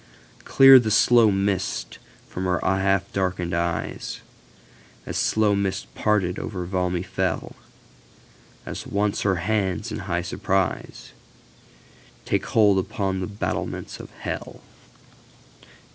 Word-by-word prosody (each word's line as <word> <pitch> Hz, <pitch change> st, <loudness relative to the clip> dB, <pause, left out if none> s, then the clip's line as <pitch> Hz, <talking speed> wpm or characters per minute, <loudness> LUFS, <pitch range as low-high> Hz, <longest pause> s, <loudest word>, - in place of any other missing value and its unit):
Clear 135 Hz, -1 st, +8 dB
the 115 Hz, -3 st, -1 dB
slow 115 Hz, +1 st, +5 dB
mists 100 Hz, -1 st, -2 dB, 0.3 s
from 90 Hz, -, -5 dB
her 90 Hz, -1 st, +1 dB
half 95 Hz, 0 st, +1 dB
darkened 90 Hz, -3 st, -1 dB
eyes, 85 Hz, 0 st, -3 dB, 0.8 s
As -, -, -6 dB
slow 110 Hz, -1 st, +2 dB
mists 100 Hz, -9 st, -1 dB
parted 95 Hz, -, 0 dB
over 90 Hz, -4 st, -5 dB
Valmy 90 Hz, -1 st, -1 dB
fell, 95 Hz, -2 st, -2 dB, 1.1 s
As -, -, -6 dB
once 100 Hz, 0 st, 0 dB
again 100 Hz, -, +1 dB
her 95 Hz, -, +2 dB
hands 95 Hz, -3 st, -1 dB
in -, -, -4 dB
high -, -, -2 dB
surpriseTake 95 Hz, -2 st, -2 dB, 1.3 s
hold 105 Hz, -3 st, +4 dB
upon 95 Hz, -1 st, -2 dB
the 90 Hz, -, -3 dB
battlements 105 Hz, 0 st, -4 dB
of -, -, -9 dB
Hell. -, -, -6 dB
95 Hz, 115 wpm, -24 LUFS, 90-105 Hz, 1.3 s, Clear